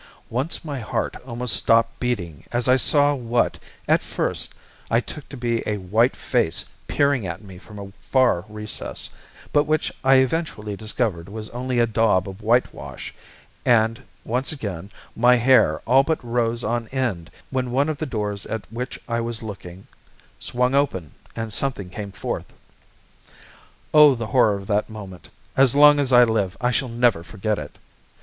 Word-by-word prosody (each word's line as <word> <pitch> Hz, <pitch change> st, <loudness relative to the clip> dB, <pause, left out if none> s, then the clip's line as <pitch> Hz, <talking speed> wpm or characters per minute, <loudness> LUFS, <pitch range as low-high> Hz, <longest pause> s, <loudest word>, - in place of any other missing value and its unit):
Once 135 Hz, +8 st, -2 dB
my 145 Hz, -4 st, -4 dB
heart 110 Hz, -, -2 dB
almost 120 Hz, -3 st, +1 dB
stopped 115 Hz, +3 st, +3 dB
beating 85 Hz, -, -3 dB
as 120 Hz, +1 st, 0 dB
I 130 Hz, -, +6 dB
saw 145 Hz, +2 st, +4 dB
what, 120 Hz, -3 st, 0 dB, 0.3 s
at -, -, +4 dB
first, -, -, -2 dB, 0.3 s
I 115 Hz, -, +3 dB
took 145 Hz, +4 st, -8 dB
to 140 Hz, -, -8 dB
be 120 Hz, -1 st, -1 dB
a 105 Hz, -, -1 dB
white 110 Hz, +7 st, +2 dB
face 120 Hz, -10 st, 0 dB, 0.2 s
peering 140 Hz, -8 st, +1 dB
at 85 Hz, 0 st, -5 dB
me 95 Hz, -3 st, -11 dB
from 105 Hz, +2 st, -13 dB
a 100 Hz, -1 st, -8 dB
far 130 Hz, -10 st, +2 dB
recess, 105 Hz, 0 st, -4 dB, 0.4 s
but 145 Hz, 0 st, +4 dB
which 155 Hz, 0 st, 0 dB
I 135 Hz, 0 st, +6 dB
eventually 130 Hz, -6 st, 0 dB
discovered 105 Hz, -5 st, -2 dB
was 110 Hz, +1 st, -7 dB
only 125 Hz, +1 st, -3 dB
a 120 Hz, -, +5 dB
daub 110 Hz, -4 st, +2 dB
of 95 Hz, +2 st, -9 dB
whitewash; 120 Hz, +4 st, -1 dB, 0.5 s
and, 115 Hz, -1 st, +3 dB, 0.2 s
once 125 Hz, +4 st, -1 dB
again, 100 Hz, -, -5 dB, 0.3 s
my 125 Hz, +2 st, +5 dB
hair 120 Hz, -10 st, +4 dB
all 130 Hz, +3 st, +5 dB
but 160 Hz, +3 st, 0 dB
rose 120 Hz, 0 st, 0 dB
on 115 Hz, +1 st, -1 dB
end, 115 Hz, -11 st, -2 dB, 0.2 s
when 130 Hz, -2 st, -1 dB
one 135 Hz, +4 st, +1 dB
of 155 Hz, -3 st, -3 dB
the 155 Hz, -, -2 dB
doors 105 Hz, -4 st, -3 dB
at 110 Hz, -1 st, -4 dB
which 125 Hz, +2 st, -5 dB
I 115 Hz, 0 st, -1 dB
was 115 Hz, -1 st, -4 dB
looking 95 Hz, -3 st, -9 dB, 0.5 s
swung 125 Hz, +1 st, 0 dB
open 95 Hz, -, 0 dB, 0.2 s
and 115 Hz, -2 st, -4 dB
something 105 Hz, -8 st, -2 dB
came 100 Hz, 0 st, -6 dB
forth. -, -, -5 dB, 1.4 s
Oh, 150 Hz, -3 st, +8 dB
the 115 Hz, -1 st, -4 dB
horror 110 Hz, -3 st, +3 dB
of 100 Hz, 0 st, -7 dB
that 105 Hz, +2 st, 0 dB
moment, 100 Hz, -4 st, -10 dB, 0.3 s
as 135 Hz, -1 st, +4 dB
long 145 Hz, 0 st, +7 dB
as 135 Hz, -2 st, 0 dB
I 125 Hz, -1 st, +8 dB
live 110 Hz, -5 st, 0 dB
I 125 Hz, 0 st, +1 dB
shall 125 Hz, +1 st, 0 dB
never 115 Hz, -6 st, +2 dB
forget 105 Hz, +4 st, -3 dB
it. 75 Hz, -1 st, -9 dB
115 Hz, 170 wpm, -23 LUFS, 105-130 Hz, 1.4 s, Oh